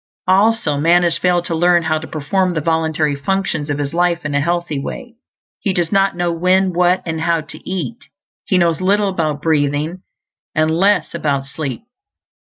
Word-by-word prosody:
Also, 195 -5 +2
man 170 +3 +4
has 170 -1 +1
failed 175 -1 +1
to 170 - -3
learn 175 +1 +3
how 155 -1 0
to 160 - -8
perform 175 +4 -1
the - - +1
voluntary 160 -2 0
functions 155 0 -2
of 145 - -1
his 145 +1 -3
life 175 -1 +1
in 145 - -2
a 145 - +2
healthy 170 -2 -1
way. 240 - -7 0.5
He 195 - -1
does 175 -2 -1
not 195 -2 +2
know 175 -1 0
when, 185 +2 +2
what, 180 +1 +2
and 160 -1 -3
how 165 -1 +1
to 155 - -11
eat; 190 +6 -4 0.4
he 185 - +2
knows 170 -1 +2
little 200 +2 +2
about 155 -5 -2
breathing, 155 +2 0 0.5
and 155 0 +2
less 195 +4 +2
about 140 -3 -1
sleep. 140 - -5
170 Hz, 185 wpm, -18 LUFS, 155-185 Hz, 0.5 s, man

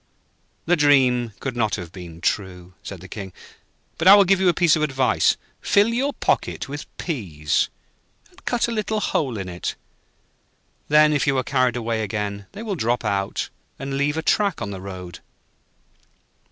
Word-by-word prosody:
'The 175 - +4
dream 130 -6 +3
could 135 -2 -4
not 110 -3 +1
have 90 -3 -7
been 85 -3 -10
true,' 90 -1 -2
said 95 -4 -8
the 95 - -10
King. 95 -1 -7 0.7
'But 165 - +2
I 195 - +11
will 200 - +7
give 195 0 +3
you 185 - +5
a - - +6
piece 170 -1 +4
of 155 - -1
advice. 135 -4 +2 0.2
Fill 205 +2 +4
your 270 +4 +1
pocket - - -1
with 145 +1 -7
peas, 85 - -1 0.6
and 370 +1 -21
cut 240 -1 0
a - - -3
little 215 -1 -1
hole 135 - -1
in 95 -2 -5
it, 90 -1 -4 1.1
then 150 0 +5
if 145 0 +1
you 140 -2 +2
are 130 - +1
carried 130 -3 +1
away 115 -2 -1
again, 100 -1 -3
they 205 +3 -7
will 215 -3 -2
drop 120 -8 -1
out 100 -1 -1 0.3
and 135 0 -4
leave 145 +2 0
a 160 - -2
track 200 -6 +2
on 100 - -4
the 95 -2 -7
road.' 90 -2 -8
130 Hz, 180 wpm, -23 LUFS, 100-165 Hz, 1.1 s, I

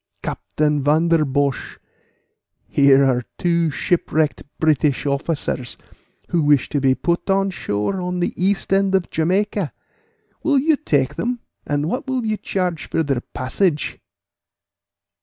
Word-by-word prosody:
Captain 150 -1 -1
Vanderbosh, 150 -3 +1 0.9
here 140 -1 +5
are 125 -2 +2 0.2
two 170 -2 +1
shipwrecked 155 0 0 0.2
British 150 -3 +2
officers, 140 -3 -2 0.5
who 170 - +1
wish 145 -3 +3
to 145 - -1
be 130 -1 +3
put 170 +5 -1
on 195 0 +2
shore 140 - -2
on 180 0 -2
the 175 - 0
east 195 +1 0
end 195 0 +3
of 190 -2 0
Jamaica; 190 +2 0 0.7
will 290 -3 +2
you 305 +3 +3
take 145 - 0
them, 240 0 -2 0.3
and 145 +1 0
what 255 +9 -3
will 260 -3 -1
you 215 -1 0
charge 180 -7 -2
for 165 - +1
their 135 -5 -1
passage?" 150 +5 0
160 Hz, 130 wpm, -21 LUFS, 145-195 Hz, 0.9 s, here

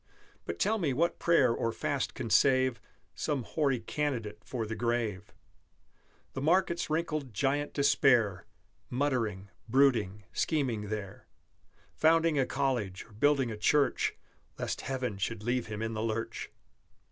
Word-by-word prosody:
But 85 - -4
tell 220 - +1
me 150 -8 0
what 170 +6 0
prayer 140 -8 +4
or 115 - -1
fast 140 +3 -2
can 115 -4 -4
save 130 -2 +4 0.3
Some 140 -4 -2
hoary 140 -1 0
candidate 115 -4 -3
for 120 -4 -4
the 110 - -4
grave, 115 -5 -2 1.0
The 135 - -4
market's 170 +2 +2
wrinkled 155 -6 -2
Giant 145 +4 0
Despair, 125 - +3 0.4
Muttering, 115 -8 -1 0.2
brooding, 115 -6 +3
scheming 125 -10 -1
there, 105 -3 -6 0.7
Founding 160 -1 +3
a 130 - +2
college 125 -9 -1
or - - -21
building 135 +2 +2
a 110 - -5
church 140 +7 +2 0.4
Lest - - -3
Heaven 125 -6 -3
should 110 +1 -3
leave 120 +1 0
him 105 0 -4
in 110 0 -2
the 110 - -3
lurch! 115 0 -3
125 Hz, 135 wpm, -30 LUFS, 110-145 Hz, 1.0 s, prayer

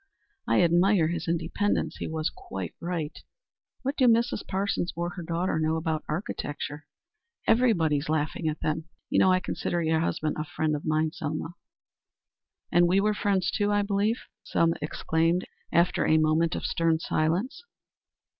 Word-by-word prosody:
"I - - +4
admire 175 0 +4
his 170 0 -3
independence. 170 +5 0
He - - -4
was 160 -1 -2
quite 95 -3 -7
right. 170 -3 -3 0.7
What 275 +2 -2
do 255 - +5
Mrs. 235 -2 +2
Parsons 190 -2 -1
or 170 +1 -2
her 195 -3 -7
daughter 170 0 -1
know 155 0 +1
about 160 -1 -1
architecture? 150 -3 -4 0.6
Everybody 220 -11 +3
is 145 +2 -4
laughing 155 +1 -1
at 155 - -5
them. 155 +1 -1 0.3
You - - +3
know 185 - +5
I 185 - +4
consider 175 -1 -2
your 160 0 +2
husband 155 -2 -1
a - - 0
friend 155 0 -1
of 145 - -6
mine, 155 0 +1
Selma." 155 +2 -4 1.2
"And 175 0 +5
we 185 +3 +3
were 210 +1 +2
friends, 195 -3 +1
too, 205 0 +1
I 205 0 +2
believe?" 205 +3 0 0.2
Selma 165 0 +2
exclaimed, 165 +3 0 0.3
after 170 +2 +3
a 160 - +5
moment 155 +1 +2
of - - -4
stern 165 -1 +2
silence. 170 - -1
165 Hz, 160 wpm, -27 LUFS, 155-190 Hz, 1.2 s, do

